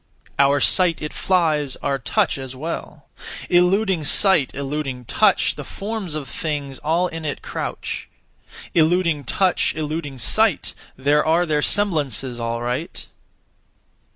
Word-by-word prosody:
Our 140 Hz, +1 st, +5 dB
sight 175 Hz, +2 st, +3 dB
it 150 Hz, -, -5 dB
flies, 155 Hz, -7 st, +1 dB
our 140 Hz, -1 st, 0 dB
touch 125 Hz, +2 st, 0 dB
as 130 Hz, -1 st, -7 dB
well. 160 Hz, +6 st, -6 dB, 0.5 s
Eluding 180 Hz, 0 st, +3 dB
sight, 170 Hz, -1 st, +3 dB
eluding 135 Hz, -2 st, -4 dB
touch, -, -, +3 dB
The -, -, -7 dB
forms 200 Hz, -5 st, -4 dB
of 150 Hz, -3 st, -4 dB
things 145 Hz, -2 st, -4 dB
all 165 Hz, +4 st, +1 dB
in 165 Hz, -2 st, -5 dB
it 145 Hz, -2 st, -4 dB
crouch; -, -, -5 dB, 0.6 s
Eluding 165 Hz, -3 st, +2 dB
touch, 185 Hz, +7 st, +1 dB
eluding 155 Hz, -2 st, -4 dB
sight, 120 Hz, -, +1 dB, 0.2 s
There 145 Hz, +3 st, +3 dB
are 165 Hz, +3 st, +3 dB
their 150 Hz, -3 st, +1 dB
semblances, 145 Hz, -, 0 dB
all 115 Hz, 0 st, -2 dB
right. 125 Hz, +8 st, -3 dB
150 Hz, 125 wpm, -22 LUFS, 135-175 Hz, 0.6 s, Our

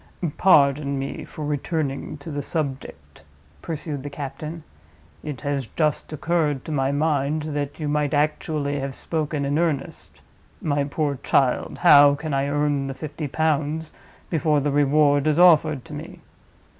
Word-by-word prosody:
"Pardon 140 Hz, -5 st, +4 dB
me 135 Hz, 0 st, -4 dB
for 155 Hz, -, -7 dB
returning 150 Hz, 0 st, -2 dB
to 145 Hz, +3 st, -9 dB
the 145 Hz, 0 st, -3 dB
subject," 140 Hz, -2 st, -5 dB, 0.4 s
pursued 150 Hz, -3 st, -4 dB
the 145 Hz, -, -6 dB
captain. 150 Hz, +3 st, -7 dB, 0.6 s
"It 145 Hz, -6 st, -6 dB
has 140 Hz, -3 st, -2 dB
just 155 Hz, +2 st, -1 dB
occurred 155 Hz, -3 st, 0 dB
to -, -, -5 dB
my 135 Hz, -2 st, +1 dB
mind 150 Hz, 0 st, 0 dB
that 145 Hz, +1 st, -3 dB
you 155 Hz, -, -2 dB
might 145 Hz, -1 st, 0 dB
actually 145 Hz, -1 st, 0 dB
have 135 Hz, -1 st, -4 dB
spoken 155 Hz, -3 st, -2 dB
in 145 Hz, +3 st, 0 dB
earnest. 155 Hz, -5 st, -3 dB, 0.4 s
My 145 Hz, -2 st, 0 dB
poor 145 Hz, -2 st, -2 dB
child! 130 Hz, -3 st, +1 dB
how 145 Hz, 0 st, +8 dB
can 155 Hz, 0 st, -5 dB
I 135 Hz, 0 st, +1 dB
earn 145 Hz, -1 st, 0 dB
the 135 Hz, -, -5 dB
fifty 155 Hz, 0 st, -5 dB
pounds 155 Hz, +1 st, -1 dB, 0.4 s
before 155 Hz, -2 st, +2 dB
the 145 Hz, +1 st, 0 dB
reward 145 Hz, 0 st, +3 dB
is 155 Hz, 0 st, +2 dB
offered 155 Hz, -6 st, +5 dB
to -, -, -10 dB
me? -, -, -8 dB
145 Hz, 150 wpm, -23 LUFS, 140-155 Hz, 0.6 s, how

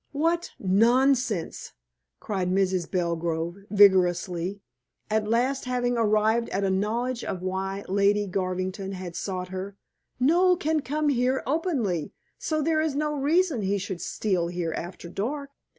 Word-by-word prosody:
"What 330 Hz, +4 st, 0 dB
nonsense!" 230 Hz, 0 st, +2 dB, 0.5 s
cried 190 Hz, -4 st, -2 dB
Mrs. 185 Hz, -2 st, +1 dB
Belgrove 170 Hz, -1 st, -1 dB
vigorously, 185 Hz, -2 st, +3 dB, 0.5 s
at 215 Hz, -1 st, +1 dB
last 250 Hz, +5 st, +1 dB
having 245 Hz, -1 st, 0 dB
arrived 220 Hz, +1 st, +2 dB
at 195 Hz, -, -1 dB
a 195 Hz, -, +1 dB
knowledge 230 Hz, +6 st, -1 dB
of 180 Hz, -1 st, -4 dB
why 190 Hz, +1 st, -3 dB
Lady 200 Hz, +2 st, +2 dB
Garvington 185 Hz, +1 st, -3 dB
had 180 Hz, -2 st, -7 dB
sought 185 Hz, -2 st, -4 dB
her. 190 Hz, +2 st, -6 dB, 0.4 s
"Noel 350 Hz, +7 st, +4 dB
can 315 Hz, -1 st, +1 dB
come 295 Hz, +3 st, -1 dB
here 255 Hz, 0 st, +1 dB
openly, 260 Hz, -, -1 dB, 0.3 s
so 310 Hz, -1 st, -1 dB
there 315 Hz, 0 st, +2 dB
is 310 Hz, -3 st, -1 dB
no 300 Hz, +1 st, 0 dB
reason 300 Hz, -, +2 dB
he 200 Hz, +1 st, 0 dB
should 190 Hz, -2 st, -5 dB
steal 185 Hz, -5 st, -1 dB
here 170 Hz, -2 st, -3 dB
after 175 Hz, 0 st, -6 dB
dark." 275 Hz, -, -4 dB
205 Hz, 135 wpm, -26 LUFS, 185-265 Hz, 0.5 s, Noel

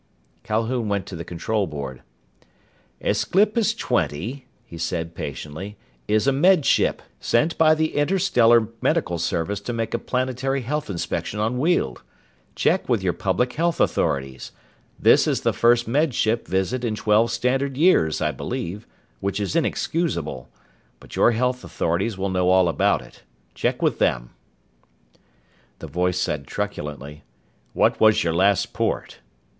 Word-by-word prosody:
Calhoun 115 Hz, +1 st, -1 dB
went 100 Hz, -1 st, -1 dB
to 95 Hz, -, -8 dB
the 85 Hz, -, -6 dB
control 100 Hz, +5 st, -2 dB
board. 70 Hz, -4 st, -6 dB, 1.0 s
"Aesclipus 215 Hz, +3 st, +2 dB
Twenty," 120 Hz, -, -2 dB, 0.2 s
he -, -, -11 dB
said 85 Hz, 0 st, -3 dB
patiently, 80 Hz, +7 st, -7 dB, 0.3 s
"is 110 Hz, +2 st, +2 dB
a 140 Hz, -, +4 dB
Med 155 Hz, +3 st, +4 dB
Ship, -, -, +2 dB, 0.2 s
sent 155 Hz, +8 st, +1 dB
by 155 Hz, -1 st, +5 dB
the 160 Hz, 0 st, -1 dB
Interstellar 135 Hz, -, +3 dB
Medical 85 Hz, -1 st, 0 dB
Service 85 Hz, +4 st, -1 dB
to 120 Hz, -, -4 dB
make 115 Hz, -1 st, -3 dB
a 120 Hz, -, 0 dB
planetary 130 Hz, +2 st, -1 dB
health 150 Hz, +3 st, -3 dB
inspection 100 Hz, +2 st, -3 dB
on 115 Hz, +4 st, 0 dB
Weald. 145 Hz, -, 0 dB, 0.5 s
Check -, -, +1 dB
with -, -, +1 dB
your -, -, +1 dB
public 125 Hz, 0 st, -1 dB
health 170 Hz, +1 st, 0 dB
authorities. 65 Hz, -1 st, -1 dB, 0.5 s
This -, -, +5 dB
is -, -, 0 dB
the -, -, +1 dB
first 120 Hz, 0 st, +3 dB
Med 140 Hz, +2 st, +1 dB
Ship 115 Hz, +2 st, 0 dB
visit 95 Hz, +7 st, -1 dB
in 110 Hz, -3 st, -1 dB
twelve 110 Hz, +2 st, +2 dB
standard 130 Hz, +3 st, -1 dB
years, 145 Hz, -, +3 dB
I 75 Hz, -, +1 dB
believe 85 Hz, -, -5 dB, 0.3 s
which 100 Hz, +6 st, -2 dB
is 100 Hz, +8 st, -2 dB
inexcusable. 120 Hz, -, -1 dB, 0.5 s
But -, -, -12 dB
your 120 Hz, -, +4 dB
health 125 Hz, +2 st, -1 dB
authorities 90 Hz, +6 st, -1 dB
will 95 Hz, +1 st, -2 dB
know 90 Hz, -1 st, +1 dB
all 95 Hz, -1 st, +5 dB
about 85 Hz, -, +1 dB
it. -, -, -17 dB, 0.3 s
Check -, -, -1 dB
with -, -, +1 dB
them." -, -, 0 dB, 1.5 s
The -, -, -9 dB
voice 90 Hz, 0 st, -1 dB
said 75 Hz, -6 st, -2 dB
truculently: 75 Hz, 0 st, -5 dB, 0.5 s
"What -, -, +2 dB
was 110 Hz, -1 st, +5 dB
your 85 Hz, -1 st, 0 dB
last 95 Hz, +3 st, +2 dB
port?" -, -, -2 dB
110 Hz, 145 wpm, -23 LUFS, 85-130 Hz, 1.5 s, by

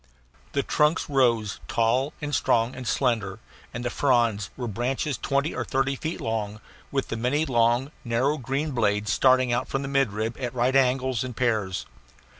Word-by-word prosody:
The 140 Hz, -, +1 dB
trunks 150 Hz, +3 st, +2 dB
rose 115 Hz, -6 st, +2 dB
tall 125 Hz, +5 st, +1 dB
and 145 Hz, 0 st, -3 dB
strong 115 Hz, -2 st, +2 dB
and 130 Hz, -2 st, -7 dB
slender, 110 Hz, -8 st, 0 dB, 0.3 s
and 120 Hz, +1 st, -5 dB
the 120 Hz, -, -1 dB
fronds 115 Hz, -7 st, +2 dB
were 125 Hz, -2 st, -3 dB
branches 125 Hz, +6 st, -1 dB
twenty 140 Hz, +5 st, -1 dB
or -, -, -2 dB
thirty 135 Hz, 0 st, 0 dB
feet 160 Hz, +5 st, -4 dB
long, 110 Hz, -2 st, -3 dB, 0.3 s
with 135 Hz, -1 st, -1 dB
the 115 Hz, -, -3 dB
many 135 Hz, +7 st, +1 dB
long, 120 Hz, +1 st, +2 dB
narrow 130 Hz, +6 st, 0 dB
green 135 Hz, +4 st, -2 dB
blades 105 Hz, -3 st, +1 dB
starting 130 Hz, -2 st, +4 dB
from 135 Hz, -, -3 dB
the -, -, -4 dB
midrib 115 Hz, -5 st, 0 dB
at 125 Hz, -2 st, -4 dB
right 125 Hz, +2 st, +1 dB
angles 130 Hz, -2 st, +2 dB
in 125 Hz, -2 st, -6 dB
pairs. 110 Hz, -7 st, 0 dB
125 Hz, 165 wpm, -25 LUFS, 115-135 Hz, 0.3 s, starting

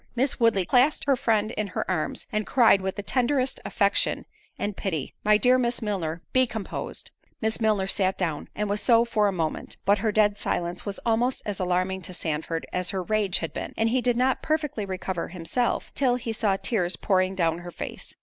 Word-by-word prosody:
Miss 265 Hz, +3 st, 0 dB
Woodley 225 Hz, -6 st, +3 dB
clasped 255 Hz, -, +3 dB
her 280 Hz, -1 st, +4 dB
friend 220 Hz, -3 st, +1 dB
in 215 Hz, -3 st, -2 dB
her 185 Hz, -, -3 dB
arms, 160 Hz, -5 st, -1 dB
and 215 Hz, -1 st, -1 dB
cried 230 Hz, -6 st, +5 dB
with 190 Hz, 0 st, -2 dB
the 205 Hz, -, -5 dB
tenderest 255 Hz, +3 st, 0 dB
affection 200 Hz, -3 st, +1 dB, 0.3 s
and 205 Hz, -1 st, -2 dB
pity, 160 Hz, -10 st, -3 dB
"My 210 Hz, 0 st, +5 dB
dear 250 Hz, +3 st, +4 dB
Miss 240 Hz, -1 st, 0 dB
Milner, 175 Hz, -6 st, -3 dB
be 255 Hz, 0 st, +4 dB
composed." 220 Hz, -4 st, -6 dB, 0.3 s
Miss 220 Hz, +1 st, -1 dB
Milner 215 Hz, -3 st, +2 dB
sat 190 Hz, -1 st, 0 dB
down, 165 Hz, -5 st, -2 dB
and 210 Hz, 0 st, -1 dB
was 205 Hz, +1 st, -1 dB
so 230 Hz, +2 st, +5 dB
for 215 Hz, -3 st, +2 dB
a -, -, +1 dB
minute; 165 Hz, -4 st, -3 dB
but 200 Hz, +1 st, +4 dB
her 215 Hz, +1 st, +1 dB
dead 205 Hz, -1 st, +3 dB
silence 175 Hz, +3 st, -2 dB
was 200 Hz, -, -4 dB
almost 240 Hz, +3 st, +1 dB
as 205 Hz, -2 st, -3 dB
alarming 185 Hz, +1 st, 0 dB
to 180 Hz, +1 st, -6 dB
Sandford 160 Hz, 0 st, -2 dB
as 180 Hz, 0 st, -1 dB
her 190 Hz, -2 st, -2 dB
rage 205 Hz, -2 st, +1 dB
had 165 Hz, -, -4 dB
been; -, -, -5 dB
and 225 Hz, 0 st, +2 dB
he 255 Hz, +2 st, +2 dB
did 245 Hz, -1 st, +1 dB
not 260 Hz, +1 st, +2 dB
perfectly 300 Hz, -9 st, -1 dB
recover 185 Hz, -2 st, -3 dB
himself 180 Hz, +8 st, -2 dB
till 255 Hz, -3 st, +2 dB
he 235 Hz, -2 st, -3 dB
saw 205 Hz, -3 st, +1 dB
tears 185 Hz, -6 st, 0 dB
pouring 185 Hz, +1 st, +1 dB
down 165 Hz, -2 st, +1 dB
her 175 Hz, 0 st, -8 dB
face. -, -, -8 dB
205 Hz, 205 wpm, -26 LUFS, 185-235 Hz, 0.3 s, cried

